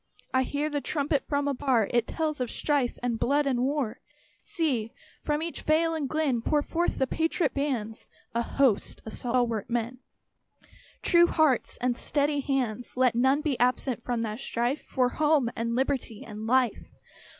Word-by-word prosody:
I 260 - +4
hear 290 +3 -1
the 290 -2 -2
trumpet 290 -1 -1
from 285 -1 0
afar; 260 -6 +1
It 240 -1 +2
tells 310 -4 -2
of 245 - -1
strife 285 -5 0
and 235 -2 -1
blood 285 +3 +2
and 255 -3 +1
war. 270 -3 -1 0.4
See! 290 - -1 0.3
from 300 +1 -1
each 335 - -5
vale 325 +2 +2
and 300 -4 -2
glen 295 -7 0
Pour 295 +4 +1
forth 345 +3 -1
the 265 - +2
patriot 325 +2 0
bands 245 -6 -3 0.3
A 235 - +1
host 245 -3 +1
of 220 - -7
stalwart 240 -3 -1
men, 240 +1 -2 1.0
True 345 -1 +6
hearts 310 -7 +2
and 245 -1 +1
steady 290 +3 0
hands. 250 -4 -2
Let 255 -2 +4
none 265 +5 +3
be 295 -5 -1
absent 250 -1 +1
from 235 -1 -2
that 215 0 -4
strife 245 +2 -1
For 250 -1 0
home, 295 -4 +2
and 230 +1 -2
liberty, 260 -4 -1
and 215 0 -7
life. 255 0 +1
265 Hz, 165 wpm, -27 LUFS, 240-295 Hz, 1.0 s, True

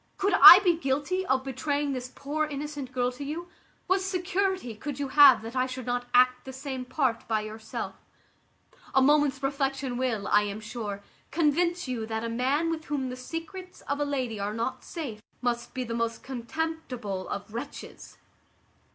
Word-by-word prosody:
Could 400 0 +1
I 350 - +14
be 350 -3 +4
guilty 325 +5 -1
of 265 0 +2
betraying 285 +2 -1
this 255 -1 -4
poor 305 +2 -2
innocent 290 -2 -5
girl 250 -1 0
to 255 +3 -8
you, 325 +5 -5 0.4
what 380 +1 +2
security 375 - -1
could 275 +6 -6
you 280 -2 -2
have 265 -5 +7
that 230 +3 -7
I 255 0 +1
should 255 -1 -6
not 245 0 -2
act 250 0 +4
the 265 - -8
same 265 -1 -5
part 250 -3 -1
by 220 -1 +1
yourself? 220 +1 -6 1.0
A 270 - +6
moment's 290 -1 +3
reflection 270 -2 -1
will, 235 -6 -1
I 210 - +5
am 205 0 -4
sure, 215 -2 -6 0.3
convince 340 +2 +1
you 235 -4 -3
that 220 0 -3
a 230 - -2
man 270 +8 0
with 315 -1 -4
whom 275 -3 -2
the 250 - -5
secrets 330 +7 -7
of 285 +1 -3
a - - +2
lady 260 -7 -2
are 205 +2 -3
not 250 +3 -3
safe 265 -11 -6 0.2
must 240 0 -2
be 255 - -1
the 230 -1 -5
most 230 0 -2
contemptible 255 -6 -4
of 205 +2 -6
wretches." 250 +5 -8
265 Hz, 175 wpm, -27 LUFS, 235-300 Hz, 1.0 s, I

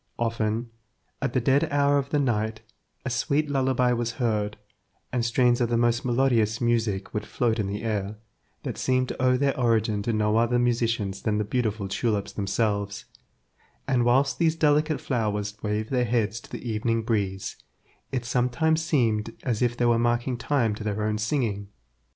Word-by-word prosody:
Often, 115 0 -1 0.5
at 130 -2 -1
the 130 - +3
dead 135 +4 +2
hour 145 0 +3
of 140 0 -4
the 150 - +1
night, 110 -5 0 0.4
a - - -1
sweet 145 +4 0
lullaby 130 -2 +2
was 120 0 -1
heard, 105 -3 -1 0.6
and 125 -2 +1
strains 120 +1 +2
of 120 - +1
the 120 - +1
most 120 0 +2
melodious 120 -3 +2
music 115 -5 0
would 105 - -2
float 115 +1 0
in 105 - 0
the 100 +2 -4
air, 105 -2 -2 0.5
that - - -4
seemed 130 0 +1
to - - -5
owe 125 0 +4
their 140 +1 +1
origin 110 -4 +1
to 115 - -1
no 105 0 +1
other 120 +1 +3
musicians 115 -5 0
than 105 -2 0
the 105 - +1
beautiful 110 -2 -1
tulips 105 0 -1
themselves, 100 0 -1 0.8
and 130 -3 +2
whilst 135 +3 +2
these 165 -2 +3
delicate 150 -1 +2
flowers 105 -5 -2
waved 105 +2 -2
their 125 -2 +2
heads 115 -1 0
to - - -16
the - - -6
evening 115 +1 0
breeze, 100 -4 -2 0.5
it 125 -3 -2
sometimes 125 +7 +1
seemed 115 -8 0
as 120 -4 -1
if 120 -1 +1
they 120 - +1
were 120 -1 +3
marking 120 +2 +1
time 120 -3 0
to 105 - -6
their 105 0 -2
own 105 0 0
singing. 110 -4 -1
115 Hz, 175 wpm, -26 LUFS, 105-125 Hz, 0.8 s, owe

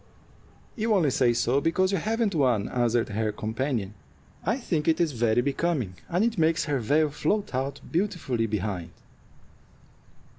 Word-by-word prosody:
"You 220 -1 +1
only 160 -8 +3
say 125 -1 +3
so 120 +3 +1
because 185 +4 +2
you 195 - +1
haven't 220 +1 0
one," 125 -9 +2
answered 120 -1 +1
her 110 +1 -1
companion. 110 -1 -3 0.5
"I 225 +8 0
think 170 - -2
it 165 +1 +3
is 170 -3 +2
very 120 -2 +2
becoming, 140 - -1 0.2
and 180 +6 +2
it 230 -5 -1
makes 165 +1 +2
her 145 -3 0
veil 145 +6 +2
float 205 +6 -1
out 135 +2 -2
beautifully 160 - 0
behind." 95 -5 -3
140 Hz, 150 wpm, -26 LUFS, 115-175 Hz, 0.5 s, only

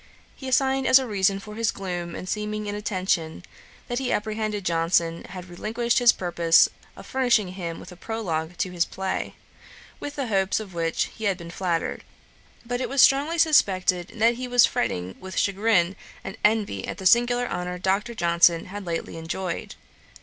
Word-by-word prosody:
He 265 - -9
assigned 265 0 +2
as 260 - +8
a 265 - 0
reason 195 -3 +1
for 210 +2 -10
his 225 +1 0
gloom 175 -3 -4
and 185 - -7
seeming 210 +1 -3
inattention, 190 -5 -2 0.4
that 245 +1 -2
he 265 - -2
apprehended 215 -1 -2
Johnson 165 0 +1
had 185 -1 -9
relinquished 225 +8 -1
his 240 -1 +7
purpose 170 -2 +3 0.3
of - - -12
furnishing 245 -7 +2
him 175 -3 -6
with - - -11
a - - -11
Prologue 175 -5 -4
to 185 - -2
his 175 -2 +1
play, 190 +2 -4 0.6
with 290 0 -6
the 275 - -2
hopes 195 -4 +1
of 205 -4 -9
which 165 -1 -1
he 220 - -6
had 195 -3 +1
been 170 -2 -9
flattered; 175 -2 -2 0.6
but 245 +1 -3
it - - -2
was 275 - -2
strongly 285 +6 +5
suspected 190 - +3
that 230 +1 +3
he 255 0 -4
was 245 -1 +6
fretting 95 - -2
with 190 0 -8
chagrin 195 -2 +2 0.3
and 195 - -6
envy 210 - +1
at - - -5
the 190 - -8
singular 240 +4 +4
honour 180 0 -4
Dr. 195 +6 -1
Johnson 170 -2 +3
had 205 -2 -7
lately 165 -1 -4
enjoyed. 170 +2 -4
195 Hz, 175 wpm, -25 LUFS, 175-230 Hz, 0.6 s, as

